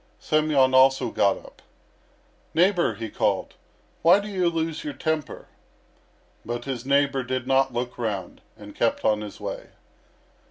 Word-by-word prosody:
Semyon 150 -4 +2
also 130 -2 +4
got 100 -1 +2
up. - - -16 0.9
"Neighbour," 180 +1 +3
he 115 - -5
called, - - -1 0.5
"why 175 +4 +6
do 205 - -6
you 185 -3 +1
lose 165 -1 -3
your 145 -2 -5
temper?" 155 -1 -3 1.0
But 120 +1 -5
his 130 -2 -5
neighbour 140 -1 +2
did 130 0 -3
not 135 0 +2
look 125 +1 -4
round, 100 -6 -4 0.2
and 105 -1 -11
kept 115 - 0
on 105 -1 +2
his 105 -1 -8
way. - - -6
135 Hz, 145 wpm, -24 LUFS, 120-155 Hz, 1.0 s, why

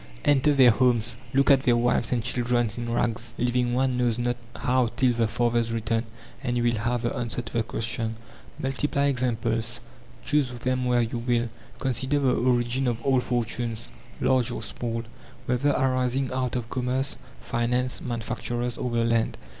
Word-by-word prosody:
Enter 145 +1 +4
their 130 -3 +7
homes, 120 -1 +2 0.2
look 140 +1 +4
at 135 -1 +6
their 120 -3 +3
wives 120 -2 +2
and 120 -3 +1
children 120 0 +1
in 120 -1 -4
rags, 120 0 -1
living 125 0 +1
one 130 -1 +1
knows 120 -2 +1
not 120 0 0 0.2
how 125 -1 +2
till 130 -2 +3
the 115 -1 +1
father's 120 0 +1
return, 115 0 -1 0.4
and 125 -3 -1
you 120 - +1
will 120 -1 +2
have 120 +2 -1
the 120 - -1
answer 120 -1 -3
to - - -10
the 115 - +2
question. 110 0 -2 0.4
Multiply 140 +1 0
examples, 120 -3 0 0.5
choose 145 -3 +2
them 125 +1 -1
where 120 -1 +3
you 115 +1 -3
will, 120 0 0 0.3
consider 130 +2 0
the 135 -3 +2
origin 125 +1 +1
of 120 -2 0
all 135 -2 +3
fortunes, 120 -1 -2 0.3
large 130 -3 +2
or - - -4
small, 115 -1 -4 0.4
whether 125 +3 +1
arising 130 -1 +1
out 130 -1 -1
of 120 -2 -2
commerce, 130 +1 -1 0.2
finance, 125 +2 -1
manufacturers, 120 0 -3
or 125 - -1
the 115 -1 +1
land. 115 -1 +1
120 Hz, 170 wpm, -26 LUFS, 115-130 Hz, 0.5 s, their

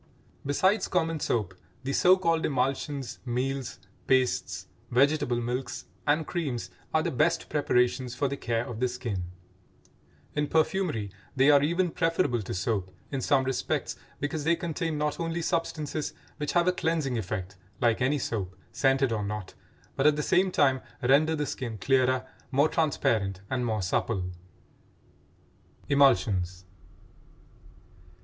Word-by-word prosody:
Besides 190 +9 +2
common 165 -3 0
soap, 105 -9 -1 0.3
the 135 +1 -2
so 185 +5 +6
called 165 -3 +1
emulsions, 135 -1 -1
meals, 130 +1 -2 0.3
pastes, 130 -1 +1 0.2
vegetable 140 -1 +3
milks 125 +2 -3 0.2
and 150 +2 +3
creams 145 -10 -3 0.2
are - - +2
the - - -1
best - - +1
preparations 125 0 +1
for 140 - +1
the 140 - -2
care 115 -3 -1
of 120 -4 -6
the 125 - +2
skin; 120 -7 -3 1.1
in 150 0 0
perfumery 155 - 0 0.2
they 135 +2 +6
are 145 -1 +6
even 170 +4 +1
preferable 165 -9 +1
to 95 - -5
soap 95 0 -1 0.2
in 135 -2 -2
some 135 +1 +3
respects 130 0 -1 0.2
because 145 +1 -2
they 165 +2 +3
contain 165 -2 -2
not 150 +2 -1
only 165 0 -2
substances 155 -3 -2 0.2
which 150 - -2
have 175 0 +3
a - - +6
cleansing 160 -7 0
effect 95 -1 -4 0.2
like 120 0 +2
any 135 +4 +2
soap, 100 -8 -3 0.2
scented 135 -2 +2
or 110 -2 -1
not, 105 -1 -5 0.4
but 135 - +3
at 150 - +5
the 150 - -1
same 185 +5 +3
time 130 -5 +3 0.2
render 150 +5 +4
the 150 -1 -1
skin 120 -5 -4
clearer, 130 +3 +2 0.2
more 140 +4 +3
transparent, 110 - +1
and 125 -2 0
more 110 -3 -1
supple. 90 0 -1 1.6
EMULSIONS. 95 -10 +3
135 Hz, 140 wpm, -28 LUFS, 120-155 Hz, 1.6 s, so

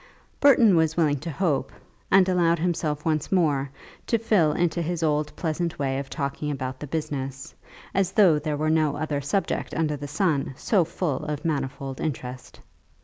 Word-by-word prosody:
Burton 240 -8 +6
was 160 -1 +2
willing 150 -4 +2
to 165 - -6
hope, 155 -3 -1 0.4
and 190 -1 +5
allowed 170 -2 +3
himself 155 -3 -1
once 155 -2 0
more 145 -7 +2 0.4
to 230 - +2
fall 210 -8 +3
into 170 0 0
his 170 0 -2
old 150 -1 +1
pleasant 170 0 -2
way 135 -1 -1
of 140 -1 -6
talking 140 0 -3
about 130 -2 -4
the 150 - -6
business 135 -3 -4 0.4
as 190 -1 +1
though 180 -7 +5
there 150 -1 -2
were 155 +1 +1
no 155 -2 +2
other 145 -1 -2
subject 170 +8 -2
under 155 -2 0
the 145 0 -6
sun 150 -4 0
so 200 -6 +2
full 165 -2 -2
of 150 +1 -4
manifold 135 -3 -3
interest. 130 -4 -5
155 Hz, 170 wpm, -25 LUFS, 140-170 Hz, 0.4 s, Burton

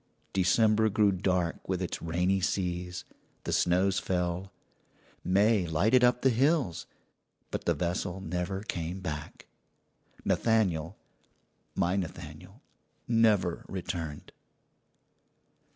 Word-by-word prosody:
December 110 +4 +3
grew 105 0 +3
dark 90 -2 -1
with 95 -2 0
its 90 - -4
rainy 90 +4 +1
seas; 90 -1 -2 0.4
the - - -3
snows 95 +2 +2
fell; 90 +1 -2 0.7
May 100 0 +3
lighted 110 +11 +3
up 125 0 +3
the 130 - +5
hills, 135 - +1 0.6
but - - -4
the - - +2
vessel 90 +1 -2
never 90 +2 -3
came 85 -2 -4
back. 75 -6 -6 0.8
Nathaniel 95 -7 +1 0.8
my 90 -1 +1
Nathaniel 90 -5 -7 0.4
never 110 -7 +2
returned. 85 -5 -5
95 Hz, 100 wpm, -29 LUFS, 85-105 Hz, 0.8 s, the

